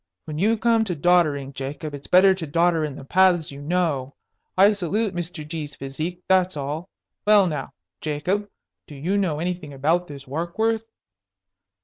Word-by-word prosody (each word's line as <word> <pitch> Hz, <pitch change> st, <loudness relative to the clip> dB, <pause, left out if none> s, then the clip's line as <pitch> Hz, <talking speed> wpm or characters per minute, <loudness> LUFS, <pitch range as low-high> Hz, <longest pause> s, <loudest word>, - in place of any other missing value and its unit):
When 155 Hz, -1 st, -5 dB
you 220 Hz, +5 st, +3 dB
come 230 Hz, 0 st, +3 dB
to 180 Hz, -4 st, -2 dB
doddering, 150 Hz, -4 st, +2 dB
Jacob, 140 Hz, +3 st, -5 dB
it's 145 Hz, 0 st, -8 dB
better 190 Hz, +1 st, +6 dB
to 180 Hz, -4 st, -5 dB
dodder 165 Hz, +2 st, +2 dB
in 150 Hz, -3 st, -3 dB
the 135 Hz, -, -10 dB
paths 180 Hz, -1 st, +3 dB
you 140 Hz, 0 st, -9 dB
know. 150 Hz, -4 st, -1 dB, 0.4 s
I 200 Hz, +3 st, +7 dB
salute 205 Hz, +2 st, -1 dB
Mr. 170 Hz, -3 st, -5 dB
G.'s 150 Hz, -3 st, -5 dB
physique, 155 Hz, +7 st, -5 dB
that's 185 Hz, -3 st, +3 dB
all. 150 Hz, +6 st, -4 dB, 0.4 s
Well, 210 Hz, -2 st, +7 dB
now, 155 Hz, -4 st, -3 dB, 0.3 s
Jacob, 180 Hz, +8 st, -1 dB, 0.4 s
do 150 Hz, -, -10 dB
you 165 Hz, +8 st, -1 dB
know 185 Hz, -7 st, +1 dB
anything 175 Hz, -4 st, -3 dB
about 165 Hz, +6 st, +1 dB
this 140 Hz, -2 st, -9 dB
Warkworth?" 220 Hz, +10 st, -1 dB
170 Hz, 160 wpm, -24 LUFS, 145-185 Hz, 0.4 s, I